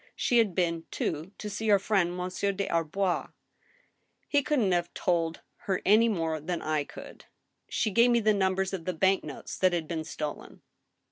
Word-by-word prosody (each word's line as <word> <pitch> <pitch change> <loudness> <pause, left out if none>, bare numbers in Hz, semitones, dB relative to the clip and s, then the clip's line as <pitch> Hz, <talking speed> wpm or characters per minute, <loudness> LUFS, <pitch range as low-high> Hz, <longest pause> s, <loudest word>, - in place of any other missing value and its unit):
She 240 - +2
had 205 -6 +2
been, 170 -3 0
too, 160 +4 -3
to 210 - -6
see 210 +2 -4
your 210 -2 +6
friend 190 -3 0
Monsieur 185 +2 -1
des 200 0 -3
Arbois." 170 +3 0 0.5
" - - -44
He 290 - +5
couldn't 255 -8 +1
have 175 -1 0
told 165 -2 0 0.3
her 190 -2 +1
any 220 +4 +5
more 165 -6 -1
than 170 +3 -3
I 155 -2 -1
could." - - -11 0.4
"She 215 - 0
gave 235 +4 +5
me 240 -1 +4
the 215 -1 +3
numbers 190 -1 0
of 175 -4 -4
the 185 - -1
bank 190 +4 +2
notes 150 -3 -7
that 185 -1 +3
had 165 -3 -1
been 160 -1 -3
stolen." 155 -2 -6
185 Hz, 190 wpm, -28 LUFS, 165-205 Hz, 0.5 s, your